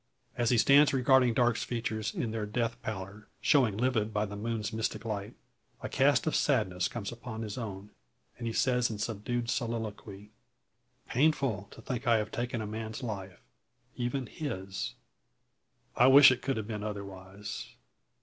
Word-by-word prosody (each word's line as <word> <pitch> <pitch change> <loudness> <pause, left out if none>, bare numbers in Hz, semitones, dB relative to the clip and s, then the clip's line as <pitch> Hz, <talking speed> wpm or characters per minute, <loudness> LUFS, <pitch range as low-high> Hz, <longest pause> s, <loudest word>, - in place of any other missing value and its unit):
As 120 -2 +1
he 125 - +4
stands 140 +4 +6
regarding 130 -2 +4
Darke's 120 -2 +2
features, 110 -3 -2
in 115 - -2
their 110 -2 -3
death 115 +2 -2
pallor 100 0 -6
showing 125 -9 +3
livid 115 -3 +1
by 105 0 0
the 105 0 -7
moon's 110 0 -3
mystic 110 +1 -2
light, 105 -2 -4 0.5
a - - -3
cast - - +3
of - - 0
sadness 90 0 +1
comes 100 +1 -5
over 120 -1 -8
his 105 -2 -5
own, 105 -4 -6 0.5
and 115 - -3
he - - -1
says 125 +1 +2
in 110 - -4
subdued 115 +3 -2
soliloquy: 110 -4 -4 0.8
"Painful 130 -7 +1
to 115 - -13
think 125 0 -4
I 115 -1 +5
have 105 0 -2
taken 120 0 -2
a - - -4
man's 110 +2 -5
life 95 -5 -6 0.5
even 125 +2 -2
his! 95 -8 -5 1.0
I 125 - +6
wish 135 0 +9
it 130 - -1
could 135 -2 -1
have 110 - -3
been 105 -1 -4
otherwise. 100 -1 -7
110 Hz, 160 wpm, -30 LUFS, 105-120 Hz, 1.0 s, wish